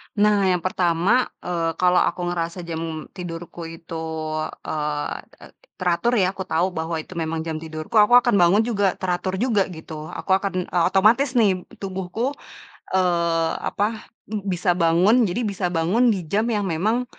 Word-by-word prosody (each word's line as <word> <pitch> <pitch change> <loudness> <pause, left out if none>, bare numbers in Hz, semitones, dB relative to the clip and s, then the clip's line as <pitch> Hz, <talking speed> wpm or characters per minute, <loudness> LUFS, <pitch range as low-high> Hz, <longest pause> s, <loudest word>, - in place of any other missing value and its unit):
Nah, 205 -2 +3
yang 180 -2 +2
pertama, 185 +6 +2 0.2
eee, 165 -2 -1
kalau 180 0 +3
aku 180 - 0
ngerasa 170 +1 -3
jam 160 -1 -5
tidurku 170 -1 -7
itu, 165 0 -7 0.6
eee 150 -1 -2 0.3
eee, - - -13 0.3
teratur 180 +5 +1
ya, 185 -2 +3
aku 195 - -7
tahu 175 +4 +1
bahwa 160 0 -3
itu 160 - -8
memang 160 0 -2
jam 160 -1 -3
tidurku, 155 +4 -7
aku 210 +3 +5
akan 240 -2 +3
bangun 180 +5 +5
juga 205 -5 +1
teratur 185 +1 -2
juga, 220 -4 +1
gitu. 160 -2 -8
Aku - - -5
akan, 195 0 +1 0.2
eee, 175 -1 +2
otomatis 230 +8 +3
nih 195 -6 +2 0.2
tubuhku, 190 +6 -3 0.6
eee, 170 -3 +2 0.2
apa, 215 +2 -2 0.4
bisa 180 -1 +1
bangun, 185 +8 +4
jadi 190 +7 -2
bisa 195 -3 -1
bangun 180 +10 +2
di 185 -4 -4
jam 215 +3 +2
yang 210 -3 0
memang, 215 +9 0
180 Hz, 155 wpm, -23 LUFS, 165-205 Hz, 0.6 s, aku